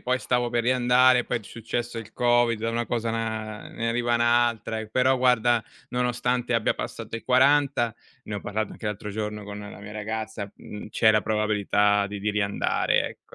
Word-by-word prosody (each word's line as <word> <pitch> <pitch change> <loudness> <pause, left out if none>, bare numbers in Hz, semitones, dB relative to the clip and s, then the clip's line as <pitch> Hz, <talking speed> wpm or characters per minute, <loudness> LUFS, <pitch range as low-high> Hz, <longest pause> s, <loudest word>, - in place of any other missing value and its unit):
poi 130 +1 0
stavo 125 -1 0
per 120 -1 +1
riandare, 125 0 +4
poi 125 - -1
è - - -15
successo 115 +2 -4
il 115 0 -9
Covid, 120 -2 +2
da 115 +1 -1
una 115 0 -1
cosa, 115 0 -1
ehm, - - -1
na 110 -1 -4
ne 115 - -3
arriva 120 +1 +1
un'altra, 120 -1 +1
però 130 +4 +2
guarda, 120 -2 +3 0.2
nonostante 125 0 0
abbia 115 - +2
passato - - -5
i 115 - -8
40, 135 -2 +3 0.3
ne 105 - -5
ho - - -5
parlato 110 0 -3
anche 110 - -8
l'altro 105 0 -4
giorno 105 0 -4
con 100 0 -7
la 105 -1 -9
mia 105 +1 -9
ragazza, 110 -1 -4
mhmm, 105 0 -9
c'è 110 - +4
la 110 -1 +3
probabilità 105 -1 +2
di 100 0 -6
di 105 +1 0
riandare 100 -1 +1
ecco. - - -16
115 Hz, 190 wpm, -25 LUFS, 105-120 Hz, 0.3 s, riandare